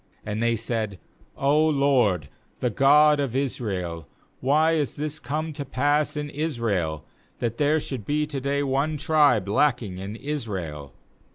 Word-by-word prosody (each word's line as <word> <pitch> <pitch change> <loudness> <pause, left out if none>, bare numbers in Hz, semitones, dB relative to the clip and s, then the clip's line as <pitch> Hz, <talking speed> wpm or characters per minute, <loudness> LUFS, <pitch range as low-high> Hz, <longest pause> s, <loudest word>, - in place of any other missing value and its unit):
3And 105 +1 -3
they 115 0 +2
said: 110 -3 -2 0.4
'0 150 +3 +3
LORD, 130 - +2 0.3
the 125 - 0
God 145 +5 +5
of 135 -4 -2
Israel, 95 - -3 0.3
why 150 +5 +3
is 150 -4 0
this 150 +1 -3
come 155 +4 -3
to 145 -1 -5
pass 145 +3 0
in 150 0 -2
Israel, 115 - -2 0.3
that 115 -1 -2
there 150 +2 +3
should 130 -6 -5
be 150 +6 0
to 145 -3 -5
day 140 +1 0
one 140 +3 0
tribe 145 - +3
lacking 110 -4 +1
in 100 +3 -6
Israel?' 95 - -5
135 Hz, 150 wpm, -25 LUFS, 105-150 Hz, 0.4 s, God